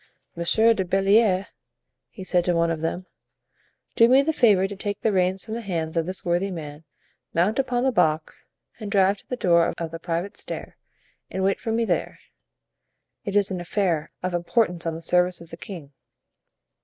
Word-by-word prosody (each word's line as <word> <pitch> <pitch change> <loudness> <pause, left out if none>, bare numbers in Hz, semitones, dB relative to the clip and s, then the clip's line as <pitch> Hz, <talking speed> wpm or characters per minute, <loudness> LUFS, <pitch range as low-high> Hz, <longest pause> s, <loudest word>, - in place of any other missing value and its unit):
"Monsieur 220 +7 +3
de 195 - -1
Belliere," 195 +1 +3 0.8
said 180 -1 +1
he 180 - +2
to 170 - +1
one 170 0 +2
of 160 -2 -3
them, 175 +3 -3 0.9
"do 230 0 +6
me 265 +2 +6
the 320 +2 0
favor 205 -8 +4
to 200 - -7
take 205 +1 -3
the 220 - +2
reins 185 0 +1
from 220 - -6
the 235 - -3
hands 165 -6 -3
of 165 0 0
this 185 0 -5
worthy 175 +3 +1
man, 155 -4 -7 0.5
mount 185 +9 +2
upon 250 -2 0
the 265 - +2
box 155 -8 0 0.3
and 210 -3 -6
drive 195 0 +3
to - - -22
the 250 - -3
door 170 -6 +3
of 165 -1 -4
the 165 - -6
private 170 +3 -3
stair, - - -7 0.5
and 190 - -3
wait 195 +1 +1
for 225 - -3
me 230 +1 +1
there; - - -1 1.1
it 200 - -3
is 200 -1 +3
an 180 -2 -3
affair 175 -4 -1
of 185 0 -2
importance 175 0 0
on 165 - -2
the 165 - -8
service 180 +1 +2
of 170 0 -14
the - - -6
king." 165 -9 -9
185 Hz, 190 wpm, -24 LUFS, 170-205 Hz, 1.1 s, do